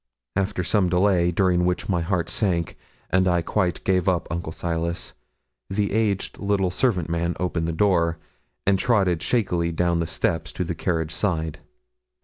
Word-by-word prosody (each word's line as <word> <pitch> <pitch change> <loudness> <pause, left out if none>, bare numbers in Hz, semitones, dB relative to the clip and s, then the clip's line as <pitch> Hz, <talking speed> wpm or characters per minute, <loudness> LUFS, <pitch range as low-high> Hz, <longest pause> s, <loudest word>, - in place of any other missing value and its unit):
After 95 -2 0
some 95 +1 +2
delay, 90 -1 +3
during 90 0 +2
which 90 0 0
my 90 -3 +1
heart 85 0 -1
sank, 85 -2 0 0.4
and 95 0 +3
I 90 -2 +2
quite 90 -3 -1
gave 95 -1 +2
up 90 -2 0
Uncle 85 -2 -3
Silas, 85 +1 -3 0.6
the 100 0 0
aged 105 -3 0
little 100 -2 +1
servant 90 -5 +1
man 85 +1 -1
opened 85 -2 -1
the - - 0
door, 85 -2 +2 0.5
and 95 -1 +3
trotted 95 -9 +2
shakily 90 -8 +1
down 85 0 +1
the 85 - -1
steps - - -1
to - - -2
the - - -3
carriage 80 -2 -1
side. 80 -4 -1
90 Hz, 160 wpm, -24 LUFS, 85-95 Hz, 0.6 s, delay